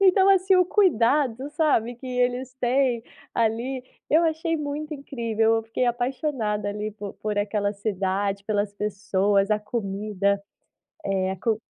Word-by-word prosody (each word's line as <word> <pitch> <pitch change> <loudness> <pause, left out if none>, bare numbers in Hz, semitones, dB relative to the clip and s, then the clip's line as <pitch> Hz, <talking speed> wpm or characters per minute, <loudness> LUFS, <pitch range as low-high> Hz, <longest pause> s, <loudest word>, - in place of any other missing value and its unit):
Então 385 0 +5
assim, 380 -1 +5
o 365 -1 +4
cuidado, 280 - +2
sabe, 275 -8 +1
que 260 +2 -10
eles 250 +1 -1
têm 245 -1 +2 0.3
ali, 235 +3 0 0.3
eu 320 +3 +5
achei 330 +1 0
muito 300 +1 -4
incrível, 230 -5 0
eu 225 - -1
fiquei 225 +3 -1
apaixonada, 240 -4 -1
ali, 210 +1 -3
por 205 -1 -7
por 210 -1 -3
aquela 205 0 0
cidade, 200 -1 -1
pelas 205 -1 0
pessoas, 200 0 +1
a 210 - +3
comida. 200 -2 -1 0.6
Eh, 190 -1 0
a - - -3
co 220 +3 0
225 Hz, 145 wpm, -25 LUFS, 205-275 Hz, 0.6 s, Então